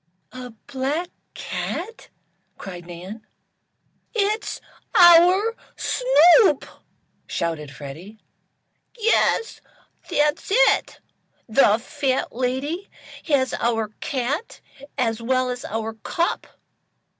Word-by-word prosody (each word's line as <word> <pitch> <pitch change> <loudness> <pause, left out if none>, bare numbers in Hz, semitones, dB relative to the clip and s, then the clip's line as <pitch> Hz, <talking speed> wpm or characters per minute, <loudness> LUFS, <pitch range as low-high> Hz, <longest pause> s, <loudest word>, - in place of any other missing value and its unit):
"A 255 -1 -8 0.2
black 285 +6 -3 0.2
cat!" 430 +7 -5 0.5
cried 175 -3 -9
Nan. 180 +6 -9 0.9
"It's 425 0 -1 0.4
our 360 +6 +6 0.2
Snoop!" 390 - +4 0.6
shouted 160 -3 -3
Freddie, 150 - -10 0.8
"yes, 455 0 +1 0.5
that's 300 -2 0
it! - - +3 0.5
The 220 -2 +4
fat 260 +2 -2
lady 265 +9 -2 0.4
has 265 -5 +1
our 225 -2 -1
cat 280 - -3 0.4
as 230 -2 -1
well 255 +1 0
as 250 0 -6
our 225 +1 -4
cup. 335 +10 -2
260 Hz, 85 wpm, -22 LUFS, 225-350 Hz, 0.9 s, our